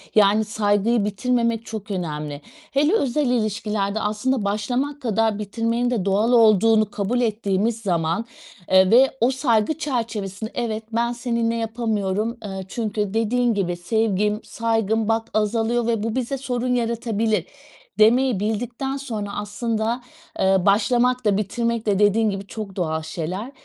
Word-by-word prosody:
yani, 210 +1 +5
saygıyı 210 +1 +1
bitirmemek 230 +2 0
çok 215 -1 -7
önemli. 150 -5 -4 0.3
Hele 295 +6 +2
özel 285 - +1
ilişkilerde, 215 -3 -1
aslında 215 +2 -1
başlamak 250 +8 -2
kadar 225 -2 +1
bitirmenin 230 +4 -1
de 220 -7 -1
doğal 205 +5 +2
olduğunu 220 -2 +5
kabul 220 +5 -1
ettiğimiz 220 0 0
zaman, 170 +2 0 0.5
eee, 190 0 +6
ve 265 +3 +5
o 245 +3 +4
saygı 255 +1 +1
çerçevesinde, 225 - -3
"Evet 225 -2 -2
ben 235 +1 +1
seninle 235 -1 -1
yapamıyorum." 225 -1 -1
Eee, 190 -2 -6
çünkü, 210 -3 -3
dediğin 235 +2 +1
gibi,"Sevgim, 210 +3 0
saygım 225 -1 0
bak 225 0 0
azalıyor 225 +2 +1
ve 225 -3 0
bu 225 +1 -2
bize 260 +2 -2
sorun 250 -1 -1
yaratabilir." 235 -1 -2 0.9
demeyi 240 +1 +4
bildikten 240 +6 -2
sonra 220 -7 -5
aslında, 220 +3 -2 0.4
eee, 190 0 +4
başlamak 240 +5 +2
da, 205 -2 +3
bitirmek 230 +2 -1
de, 200 -2 +1
dediğin 210 +1 +3
gibi 195 0 -5
çok 210 -3 -7
doğal 160 -4 -1
şeyler. 175 - -5
220 Hz, 135 wpm, -22 LUFS, 205-235 Hz, 0.9 s, eee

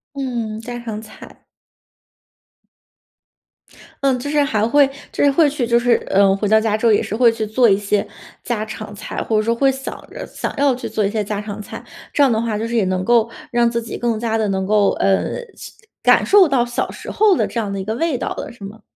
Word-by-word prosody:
嗯， 235 -5 -3
家 240 +1 -6
常 220 -3 -6
菜。 215 -1 -14 2.6
嗯， 265 -2 +2
就 285 - -5
是 295 0 +2
还 220 -6 0
会 285 +4 +5 0.3
就 - - 0
是 285 - +5
会 300 +1 +4
去 275 -4 -2
就 235 0 +3
是， 240 0 +3 0.2
呃， 195 0 +4
回 210 - -3
到 220 0 +5
家 220 -1 0
之 220 +2 -2
后 230 - +6
也 210 - +3
是 210 - -4
会 235 0 +5
去 220 -2 -4
做 235 +1 +3
一 195 - +4
些 205 0 0 0.4
家 225 -3 -2
常 215 -1 -8
菜， 205 - -5
或 220 - 0
者 - - +3
说 230 +2 +1
会 270 +3 +3
想 265 +1 -6 0.2
着 - - -7
想 - - -5
要 275 -2 +3
去 255 - -6
做 215 - 0
一 200 - +1
些 215 -1 -1
家 205 0 -3
常 210 0 -7
菜。 - - -9 0.3
这 290 - 0
样 275 - +6
的 220 -2 +1
话， 225 -2 -2
就 225 - -3
是 235 - -3
也 225 - +3
能 185 0 -1
够 230 0 +3 0.2
让 240 -1 +3
自 235 0 -1
己 225 - -6
更 235 -2 -1
加 225 -1 -1
地 220 - 0
能 190 -1 -1
够， 210 -1 +3
呃， 195 - +1 0.2
是 - - -10 0.3
感 - - +5
受 390 -6 +6
到 250 -3 +2
小 240 0 -3
时 - - -9
候 425 -2 +3
的 - - +1
这 - - -7
样 200 -2 -4
的 195 - -3
一 190 - -5
个 220 +1 -2
味 325 -1 0
道 - - -4
了， - - -6
是 235 -4 -11
吗？ 215 +3 -11
230 Hz, 260 characters per minute, -19 LUFS, 210-245 Hz, 2.6 s, 后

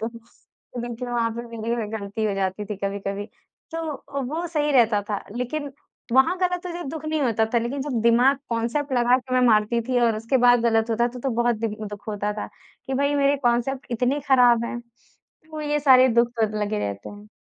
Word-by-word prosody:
तो 230 +2 -10
देखिए, 240 +1 -5
वहाँ 235 -1 0
पे 235 - -4 0.2
मेरी 230 0 -2
गलती 210 0 -4
हो 205 -2 0
जाती 195 +1 -2
थी 205 -1 -5
कभी-कभी, 200 +1 -3 0.5
तो 295 -4 -4
वो 335 +2 -2
सही 300 -2 0
रहता 230 -5 +4
था 205 - -2
लेकिन 280 +4 -3 0.4
वहाँ 265 +8 +4
गलत 360 -1 -1
हो 355 - -5
जब 345 - -6
दुःख 315 -1 -7
नहीं 310 -1 -1
होता 225 -4 +2
था - - +5
लेकिन 245 +4 -3
जब 265 -5 -2
दिमाग 240 +4 +4
कांसेप्ट 235 +5 -1
लगा 245 0 +4
के 255 0 -5
मैं 255 - +4
मारती 220 +1 +3
थी 255 -1 +2
और 230 -2 +2
उसके 230 +5 0
बाद 245 -1 +6
गलत 225 -1 +2
होता 235 +2 +2
था 250 +1 -9
तो 270 - -1
बहुत 240 -1 +2
दिन 215 -2 -1
दुःख 205 +1 -10
होता 210 0 -2
था 210 - -5 0.4
कि 265 - -2
भई 280 +2 +1
मेरे 280 0 +3
कांसेप्ट 240 +3 0
इतने 250 +5 0
ख़राब 245 -3 +5
हैं, 240 0 -5 0.7
वो 310 -1 -6
ये 295 0 0
सारे 260 -2 +6
दुःख 235 0 +3
तो 215 -1 0
लगे 210 +1 -1
रहते 100 - -4
हैं। 205 +1 -13
240 Hz, 205 wpm, -24 LUFS, 220-275 Hz, 0.7 s, बाद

